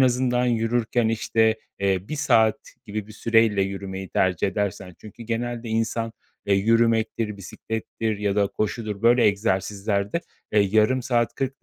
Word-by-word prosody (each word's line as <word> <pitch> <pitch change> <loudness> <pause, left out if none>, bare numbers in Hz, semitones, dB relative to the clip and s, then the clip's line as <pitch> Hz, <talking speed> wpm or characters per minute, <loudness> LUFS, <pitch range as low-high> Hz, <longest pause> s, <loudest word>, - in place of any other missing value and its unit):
azından 125 -1 +2
yürürken, 115 0 +1
işte, 110 0 +1 0.2
eee, 95 -1 0
1 155 - -3
saat 110 -7 +3 0.3
gibi 105 0 -4
bir 110 - -12
süreyle 115 -2 +2
yürümeyi 95 -1 -5
tercih 95 0 +1
edersen, 95 -3 -3
çünkü 110 +2 -12
genelde 120 +1 -3
insan, 115 0 -1 0.3
eee, 100 - +3
yürümektir, 110 0 +1
bisiklettir 110 +2 -4
ya 100 -1 -1
da 100 -1 +3
koşudur, 110 0 -3
böyle, 120 +1 +5
egzersizlerde, 100 - 0 0.3
eee, 105 - +5
yarım 110 +6 +3
saat, 120 -2 0
40 135 0 -4
110 Hz, 140 wpm, -24 LUFS, 100-115 Hz, 0.3 s, böyle